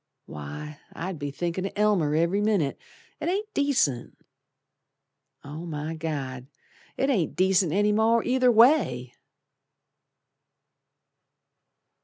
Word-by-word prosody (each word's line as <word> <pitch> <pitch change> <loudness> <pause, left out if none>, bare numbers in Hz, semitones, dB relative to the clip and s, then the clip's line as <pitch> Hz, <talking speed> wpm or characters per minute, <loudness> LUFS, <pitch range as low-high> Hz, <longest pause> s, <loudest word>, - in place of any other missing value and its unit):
Why! 145 - -8
I'd 180 -1 -5
be 145 -1 -3
thinkin' 175 +6 -3
o' - - -8
Elmer 200 -8 +2
ev'ry 170 +5 +1
minute; 200 -10 0 0.4
It - - -2
ain't 415 +3 -2
decent. 265 - 0 1.3
Oh, 150 +3 -8
my 155 0 -4
God! 140 -6 -5 0.5
It 270 +1 +1
ain't 190 - 0
decent 185 -2 +2
any 205 +4 +2
more 225 +2 +3
either 250 0 +3
way! 220 - +3
175 Hz, 105 wpm, -26 LUFS, 150-220 Hz, 1.3 s, more